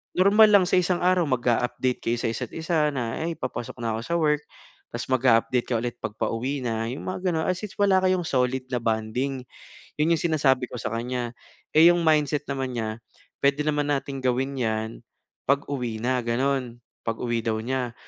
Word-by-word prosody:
normal 200 +4 +6
lang 200 -3 +6
sa - - +3
isang 180 0 +1
araw 180 0 +4
mag-a-update 125 0 0
kayo 120 +1 +1
sa - - 0
isa't 115 - -5
isa 160 -2 +1
na, 120 -4 -3
"ay 165 +1 -1
papasok 125 -2 -5
na 115 -1 0
ako - - -4
sa 170 - -3
work" 150 -2 +2 0.5
tapos - - -3
mag-a-update 125 -1 +3
ka 120 - +1
ulit 120 0 -3
'pag 105 - -4
pauwi 130 +5 -1
na. 115 -1 -1
'Yong 130 - -5
mga 185 0 -1
gano'n 160 0 0
as 185 - 0
sin 210 - -5
wala 195 -2 +5
kayong 185 -1 +2
solid 130 -2 0
na 125 - +1
bonding. 115 +4 -1 0.6
'Yon 165 +2 +4
'yong - - -5
sinasabi 135 -4 +3
ko - - -6
sa - - -2
kanya. 120 +1 -2 0.5
Eh, 165 +2 +9
'yong 175 - 0
mindset 150 -2 +2
naman 135 -2 -2
niya, 110 -1 -3 0.5
puwede 140 +1 +3
naman 145 -1 0
nating 140 0 -3
gawin 130 +2 0
'yan 110 -2 -1 0.6
'pag 140 0 +3
uwi 120 -6 -3
na. 125 +1 +1
Gano'n 125 0 0 0.3
pag-uwi 115 0 -1
daw 110 -1 0
niya. 125 0 -2
130 Hz, 190 wpm, -25 LUFS, 120-150 Hz, 0.6 s, Eh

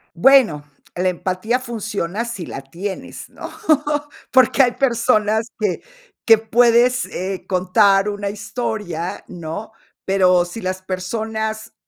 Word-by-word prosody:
Bueno, 215 - +5 0.3
la 185 +1 +1
empatía 185 +7 -1
funciona 220 -4 -3
si 230 -8 -6
la 135 - -7
tienes, 180 +8 -7
¿no?, - - -8 0.8
porque 260 +1 +5
hay 245 - +3
personas 230 -4 +1
que 210 -4 -1 0.4
que 225 -1 +7
puedes, 240 +3 +3
eh, 190 +1 -5
contar 195 +2 +3
una 205 -1 -3
historia, 210 -5 -4
¿no?, 175 +4 -7 0.3
pero 185 -2 +3
si 175 +6 -8
las 185 0 -3
personas, 220 +4 -4
210 Hz, 115 wpm, -20 LUFS, 185-230 Hz, 0.8 s, que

